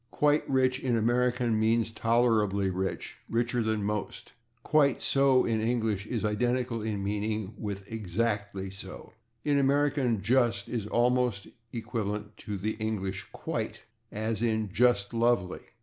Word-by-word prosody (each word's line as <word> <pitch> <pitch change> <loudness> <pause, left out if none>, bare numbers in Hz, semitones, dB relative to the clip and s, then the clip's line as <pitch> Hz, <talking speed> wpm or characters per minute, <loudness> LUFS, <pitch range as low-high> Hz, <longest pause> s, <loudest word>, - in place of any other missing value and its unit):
/Quite 150 +1 +3
rich/, 130 -1 +2
in 125 -3 0
American, 120 +1 +1
[Pg117] - - 0
means 115 0 +2
tolerably 110 -4 +2
rich, 95 +1 -3
richer 120 +1 0
than 110 -2 0
most; 105 0 -4 0.3
/quite 145 -4 +3
so/, 135 -2 +3
in 110 -1 0
English, 110 -3 0
is 115 -3 -2
identical 120 +2 0
in 105 -2 -2
meaning 105 0 -2
with 100 -2 -5
/exactly 100 -2 -2
so/. 95 -1 -9 0.3
In 145 -1 +3
American 140 -4 +2
/just/ 115 -3 +2
is 110 -4 -3
almost 120 -3 +1 0.2
equivalent 105 -2 -4
to 105 -1 -5
the 105 +3 -1
English 95 -3 -3
/quite/, - - -4 0.3
as 110 0 -2
in 110 -3 0
/just 115 0 +2
lovely 115 -6 +1
110 Hz, 135 wpm, -29 LUFS, 105-120 Hz, 0.3 s, Quite